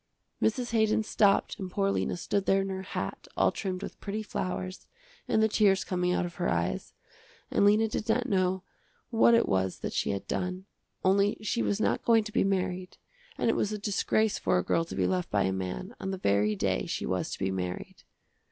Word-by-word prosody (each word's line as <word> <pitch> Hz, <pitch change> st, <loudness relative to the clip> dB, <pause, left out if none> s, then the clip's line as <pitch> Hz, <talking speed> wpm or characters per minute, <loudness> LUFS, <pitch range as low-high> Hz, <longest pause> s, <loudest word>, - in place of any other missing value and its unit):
Mrs. 240 Hz, +2 st, 0 dB
Haydon 220 Hz, -1 st, +2 dB
stopped 205 Hz, 0 st, +2 dB
and 190 Hz, -2 st, -4 dB
poor 195 Hz, +1 st, +1 dB
Lena -, -, -1 dB
stood 195 Hz, +2 st, -1 dB
there 195 Hz, 0 st, +4 dB
in 195 Hz, -, -4 dB
her 190 Hz, 0 st, -3 dB
hat, 190 Hz, -, -5 dB
all -, -, +4 dB
trimmed 190 Hz, -1 st, -4 dB
with -, -, -8 dB
pretty 215 Hz, +1 st, -3 dB
flowers, 185 Hz, -2 st, -4 dB, 0.4 s
and 220 Hz, -, +3 dB
the -, -, +5 dB
tears 205 Hz, -3 st, +3 dB
coming 180 Hz, -1 st, 0 dB
out 180 Hz, -, +1 dB
of 175 Hz, -, -6 dB
her 175 Hz, -, 0 dB
eyes, 85 Hz, -6 st, -2 dB, 0.6 s
and -, -, +3 dB
Lena 210 Hz, +2 st, +5 dB
did 215 Hz, +1 st, -4 dB
not 245 Hz, +2 st, +2 dB
know 185 Hz, -3 st, +1 dB, 0.5 s
what 230 Hz, 0 st, +5 dB
it 230 Hz, -, +3 dB
was 95 Hz, -1 st, 0 dB
that -, -, -3 dB
she -, -, 0 dB
had 100 Hz, -1 st, -3 dB
done, 185 Hz, +1 st, -3 dB, 0.4 s
only 200 Hz, +2 st, +3 dB
she 235 Hz, +3 st, 0 dB
was 205 Hz, -, 0 dB
not 220 Hz, -, +1 dB
going 225 Hz, -2 st, +4 dB
to 215 Hz, -, -7 dB
be -, -, +2 dB
married 185 Hz, -1 st, -1 dB, 0.4 s
and -, -, 0 dB
it 230 Hz, -, +3 dB
was 210 Hz, -, 0 dB
a 210 Hz, -, -2 dB
disgrace 210 Hz, +1 st, +1 dB
for -, -, +2 dB
a 90 Hz, -, +1 dB
girl 165 Hz, -, +1 dB
to -, -, -7 dB
be -, -, +1 dB
left 185 Hz, -2 st, 0 dB
by 100 Hz, -1 st, +2 dB
a 95 Hz, -, 0 dB
man 90 Hz, -10 st, -4 dB
on 190 Hz, -, -4 dB
the 190 Hz, -, -2 dB
very 105 Hz, -, +2 dB
day -, -, 0 dB
she -, -, -3 dB
was 95 Hz, -1 st, -1 dB
to -, -, -5 dB
be 95 Hz, 0 st, -1 dB
married. 90 Hz, -1 st, -5 dB
190 Hz, 215 wpm, -29 LUFS, 175-210 Hz, 0.6 s, the